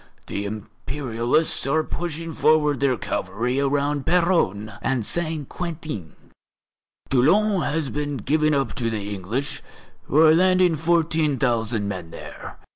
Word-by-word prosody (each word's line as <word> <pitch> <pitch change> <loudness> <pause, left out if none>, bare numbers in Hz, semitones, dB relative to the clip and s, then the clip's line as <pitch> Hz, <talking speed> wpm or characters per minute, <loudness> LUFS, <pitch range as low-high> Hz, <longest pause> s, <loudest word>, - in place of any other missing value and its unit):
The 100 - -4
Imperialists 120 +7 -2
are 155 +3 +2
pushing 165 0 -4
forward 150 -3 +3
their 135 -3 +2
cavalry 115 +8 -2
around 140 +1 0
Péronne 160 - +1
and 130 -5 0
Saint 160 -2 -2
Quentin. 155 - -6 1.0
Toulon 190 +10 +4
has 150 -2 -1
been 145 0 -3
given 155 +6 +1
up 135 -5 0
to 120 -3 0
the 105 -2 -3
English, 110 +9 -3 0.4
who 145 - -1
are 155 0 +7
landing 185 0 +4
fourteen 160 -2 +1
thousand 115 -4 0
men 90 -4 -5
there. - - -9
140 Hz, 125 wpm, -23 LUFS, 115-160 Hz, 1.0 s, are